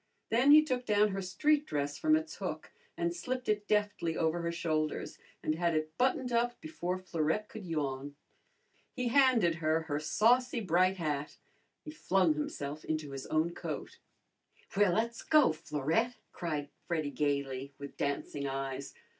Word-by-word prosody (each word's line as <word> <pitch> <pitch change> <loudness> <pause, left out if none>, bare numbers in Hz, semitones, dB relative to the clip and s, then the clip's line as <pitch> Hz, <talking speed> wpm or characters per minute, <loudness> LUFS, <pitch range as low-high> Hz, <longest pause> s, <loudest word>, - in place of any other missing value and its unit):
Then 245 +5 +4
he 305 +1 +9
took 250 -3 -2
down 210 0 +4
her 195 0 -3
street 290 +12 +1
dress 145 0 -2
from 310 0 +4
its 315 +1 -3
hook - - -5 0.3
and 345 0 -1
slipped 255 -6 -4
it 210 -1 0
deftly 205 -6 0
over 165 +1 +1
her 170 0 -1
shoulders 155 -2 -2 0.2
and 155 - +1
had 170 0 0
it 155 0 -2
buttoned 255 0 +1
up 240 +1 +1
before 185 - -3
Florette 180 +2 -1
could 215 -5 -8
yawn. 145 -3 -3 0.8
He 250 -2 -1
handed 245 -9 +4
her 155 +1 +2
her 150 -3 -2
saucy 245 +9 +3
bright 185 -1 +2
hat. 150 -3 -3 0.5
He 305 - -6
flung 190 - +2
himself 150 0 -4
into 155 -2 -3
his 135 -1 -6
own 160 +2 +1
coat. - - -6 0.8
"Well, 200 -3 +4
le's 230 +1 -1
go, 305 - +5
Florette!" 160 - -1 0.2
cried 150 -5 -3 0.2
Freddy 155 -4 -1
gayly, 140 -2 -2
with 140 0 -8
dancing 140 0 -2
eyes. 135 0 -4
170 Hz, 155 wpm, -32 LUFS, 150-235 Hz, 0.8 s, he